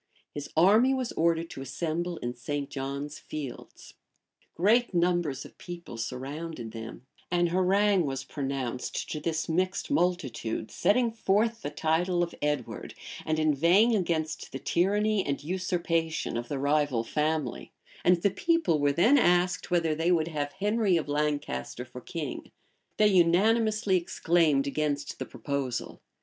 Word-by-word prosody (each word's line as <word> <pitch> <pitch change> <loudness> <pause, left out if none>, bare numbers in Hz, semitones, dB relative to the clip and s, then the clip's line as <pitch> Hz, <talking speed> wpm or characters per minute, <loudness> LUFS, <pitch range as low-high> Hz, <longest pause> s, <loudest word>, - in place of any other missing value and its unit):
His 145 -1 -6
army 215 +10 +5
was 255 -2 -2
ordered 165 0 +1
to - - -7
assemble 165 +5 -3
in 120 -4 -4
St. 140 +3 -4
John's 140 +2 -4
Fields; 145 -5 -8 0.6
great 220 +4 +3
numbers 170 -5 +1
of - - -15
people 175 -7 -8
surrounded 130 +2 -5
them; 115 +2 -8 0.2
an 175 0 +2
harangue 185 0 +3
was 135 -1 -3
pronounced 135 -3 -4
to 155 - -3
this 160 +1 -2
mixed 185 - -1
multitude, 150 - -1
setting 235 +2 +2
forth 225 +1 +1
the - - -3
title 165 +4 +1
of 170 - -4
Edward, 150 -4 -3 0.3
and 155 0 +1
inveighing 170 - +4
against 160 -5 -2
the - - -4
tyranny 205 +6 +1
and 140 0 -3
usurpation 165 -3 -1
of 120 0 -3
the 140 - -3
rival 140 -3 +1
family; 150 -1 -2 0.3
and 175 -1 +3
the 200 - +4
people 330 - +1
were 145 0 +3
then 230 - +5
asked 180 -3 +2
whether 170 -3 +2
they 165 +3 +1
would 165 -2 +2
have 145 -2 -3
Henry 205 -1 +2
of 160 - -2
Lancaster 145 - -2
for 125 0 -10
king. 160 -2 -6 0.5
They 210 0 +5
unanimously 205 +3 +3
exclaimed 165 -4 +2
against 145 0 -2
the - - -4
proposal. 140 -4 -4
165 Hz, 140 wpm, -28 LUFS, 145-185 Hz, 0.6 s, army